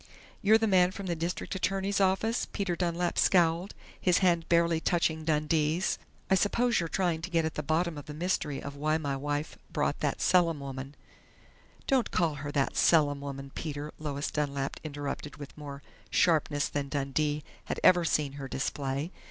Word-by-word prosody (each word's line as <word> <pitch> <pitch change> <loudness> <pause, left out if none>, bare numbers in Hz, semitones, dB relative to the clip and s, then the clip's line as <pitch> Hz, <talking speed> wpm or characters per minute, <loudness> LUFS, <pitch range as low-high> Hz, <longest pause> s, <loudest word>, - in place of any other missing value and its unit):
"You're 215 +2 +6
the 225 - +1
man 185 -4 +5
from 195 +1 -7
the 175 -2 -1
district 170 +2 -3
attorney's 195 +1 0
office?" 195 +5 +1
Peter 195 -4 -1
Dunlap 175 0 -1
scowled, 175 +1 +3 0.3
his 180 -2 +4
hand 170 -3 +2
barely 170 -1 +3
touching 160 -2 +1
Dundee's. 155 +2 +1 0.3
"I - - +2
suppose 235 +5 +2
you're 165 -1 -2
trying 175 -2 0
to 165 - -5
get 165 -2 +1
at 160 - -2
the - - -3
bottom 160 +2 0
of 145 - -12
the 150 - -7
mystery 155 -4 -1
of 140 0 -6
why 155 +2 +1
my 145 -3 -2
wife 145 +2 -3
brought - - 0
that - - -1
Selim 170 -4 +3
woman 135 0 -7 0.5
" - - -29
"Don't 265 -3 +2
call 170 -4 +1
her 145 0 -4
'that 140 -2 0
Selim 145 -4 +4
woman', 140 -1 -6
Peter!" 150 -1 -5
Lois 145 -2 -3
Dunlap 140 -2 -2
interrupted 145 -1 -5
with 145 -2 -9
more 140 -2 -8 0.3
sharpness 155 -4 +2
than 140 -1 -3
Dundee 145 +2 -1 0.2
had - - -3
ever 175 -1 +6
seen 150 -3 +1
her 140 -1 -6
display. 140 +3 -2
160 Hz, 175 wpm, -29 LUFS, 145-180 Hz, 0.5 s, You're